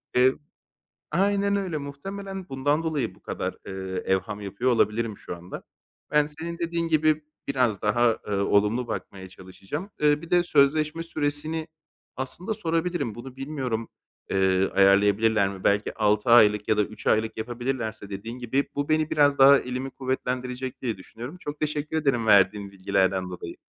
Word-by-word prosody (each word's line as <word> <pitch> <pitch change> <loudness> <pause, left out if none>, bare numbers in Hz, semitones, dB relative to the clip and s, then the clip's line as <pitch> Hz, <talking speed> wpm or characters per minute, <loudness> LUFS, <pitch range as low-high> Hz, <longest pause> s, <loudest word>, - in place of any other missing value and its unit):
Eee, 130 +1 +5 0.8
aynen 200 +3 +2
öyle, 185 -5 -2
muhtemelen 190 +6 -7
bundan 145 +4 0
dolayı 155 -5 -2
bu - - -24
kadar, - - -4
eee, 95 -1 -4
evham 95 +2 -1
yapıyor 100 +6 -1
olabilirim 110 -1 +1
şu 90 - -7
anda. 85 +1 -9 0.5
Ben 150 0 +4
senin 160 +3 -6
dediğin 170 0 -1
gibi 155 -1 +2 0.2
biraz 125 -7 +1
daha, 115 +2 +2
ııı, 100 -1 0
olumlu 105 +4 +2
bakmaya 95 -1 -6
çalışacağım. 95 - -8
Iıı, 150 0 +3
bir 170 - -10
de 175 0 +5
sözleşme 155 +1 +2
süresini 155 0 -2 0.5
aslında 165 - -4
sorabilirim. 165 - -1
Bunu 125 +2 -9
bilmiyorum, 130 -5 -3 0.4
eee, 95 0 +2
ayarlayabilirler 100 +2 +4
mi? 95 -1 -9
Belki 100 +1 +2
6 105 +1 +1
aylık 105 -3 +6
ya 110 - +3
da 105 - +4
3 110 +2 -8
aylık 110 +1 +1
yapabilirlerse 120 -2 -4
dediğin 110 +5 -6
gibi, 130 +3 -1
bu 145 0 -2
beni 155 0 +2
biraz 145 -1 +3
daha 135 +1 +8
elimi 125 +2 -4
kuvvetlendirecek 130 -1 -3
diye 115 -6 -2
düşünüyorum. 120 - -9
Çok 145 -3 -6
teşekkür 150 +1 -2
ederim 135 -7 +1
verdiğin 100 -1 +4
bilgilerden 95 -1 +1
dolayı. 90 -1 -7
125 Hz, 150 wpm, -26 LUFS, 105-150 Hz, 0.8 s, daha